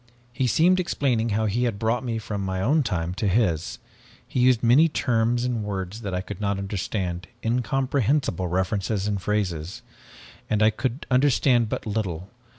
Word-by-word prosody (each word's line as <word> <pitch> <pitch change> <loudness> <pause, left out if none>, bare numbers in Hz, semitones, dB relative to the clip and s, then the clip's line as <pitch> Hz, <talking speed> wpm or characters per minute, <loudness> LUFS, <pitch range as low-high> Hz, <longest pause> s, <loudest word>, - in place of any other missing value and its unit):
"He 130 0 0
seemed 175 +9 +4
explaining 125 -9 0
how 110 +1 0
he 115 +4 0
had 115 -4 -1
brought 115 +4 0
me 115 -3 -2
from 105 -2 -4
my 95 -1 -2
own 145 +11 +3
time 90 - -2
to 105 - -2
his. 90 -6 +1 0.5
He - - -3
used 125 -1 +4
many 135 +8 +5
terms 120 -3 +1
and 120 -3 -1
words 100 +1 -4
that 100 -3 -4
I 90 - -1
could 100 +1 -8
not 100 -1 0
understand, 95 -2 -3 0.2
incomprehensible 125 - 0
references 95 +3 -1
and 100 -2 -1
phrases, 90 -5 -2 0.7
and 105 0 +2
I 110 - +5
could 125 +4 -3
understand 125 -3 +3
but - - -4
little. 100 -4 -3
110 Hz, 165 wpm, -24 LUFS, 95-125 Hz, 0.7 s, many